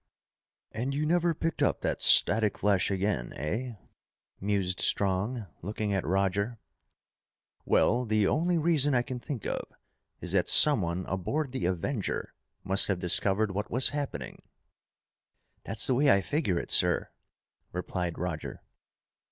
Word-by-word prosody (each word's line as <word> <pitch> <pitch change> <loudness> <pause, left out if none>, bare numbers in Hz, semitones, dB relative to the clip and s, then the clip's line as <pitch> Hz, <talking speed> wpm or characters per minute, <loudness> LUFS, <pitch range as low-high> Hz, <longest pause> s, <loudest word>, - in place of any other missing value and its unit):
and 125 +5 -3
you 150 +2 -1
never 170 +1 +1
picked 165 +2 -3
up - - +1
that - - -2
static 110 -1 +5
flash 100 -2 +1
again, 95 -10 -2
eh?" 115 - -4 0.6
mused 95 -2 -1
Strong, 100 +4 0 0.2
looking 105 +2 -3
at 95 - 0
Roger. 100 +6 -1 1.1
"Well, 120 +1 +2
the 110 -1 +2
only 170 - +1
reason 150 -4 +3
I 120 - +2
can 125 0 -6
think 120 -3 -6
of - - -2 0.6
is 90 - -4
that 90 -2 +2
someone 95 - +4
aboard 130 - -3
the 130 -8 -2
Avenger 95 +5 -3 0.3
must 95 +1 +1
have 100 - 0
discovered 95 +4 +2
what 105 +2 -4
was 125 +3 +3
happening." 140 - -5 1.2
"That's 110 -1 +1
the 130 - +1
way 140 +3 +3
I 100 - +4
figure 140 - -1
it, - - -4
sir," - - +2 0.6
replied 90 -1 -4
Roger. 85 -3 -5
105 Hz, 135 wpm, -28 LUFS, 95-130 Hz, 1.2 s, static